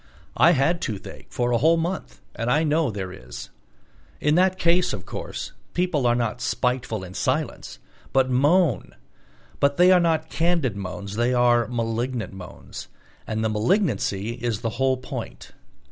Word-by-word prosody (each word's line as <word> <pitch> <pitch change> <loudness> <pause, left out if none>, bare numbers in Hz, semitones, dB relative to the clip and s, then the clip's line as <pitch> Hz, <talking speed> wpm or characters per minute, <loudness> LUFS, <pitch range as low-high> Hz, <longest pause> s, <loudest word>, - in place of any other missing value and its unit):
I 170 - +6
had 160 +4 +1
toothache 105 -4 -6
for 120 0 -1
a 120 - +3
whole 165 +6 +4
month 175 +3 -4
and 115 +1 -3
I 150 +6 +3
know 155 -1 +2
there 95 -4 -5
is. 60 -8 -9 0.7
In 150 - +2
that 185 +2 +3
case, 175 +1 +2
of 100 -4 -6
course, - - -6 0.2
people 170 -8 +1
are 120 - +3
not 120 0 -1
spiteful 125 -5 -1
in 90 0 -9
silence, - - -2 0.3
but 135 -1 +3
moan; 145 - +2 0.6
but 140 0 +2
they 180 +1 +6
are 185 - +7
not 160 -2 +1
candid 165 - +1
moans, 100 +1 -6
they 120 +2 +2
are 120 -1 +4
malignant 115 -2 -2
moans, 90 -2 -9 0.4
and 110 0 -2
the - - +2
malignancy 110 - 0
is 120 -2 -3
the 115 -1 -1
whole 130 -1 +3
point. 130 - -7
125 Hz, 160 wpm, -24 LUFS, 110-160 Hz, 0.7 s, are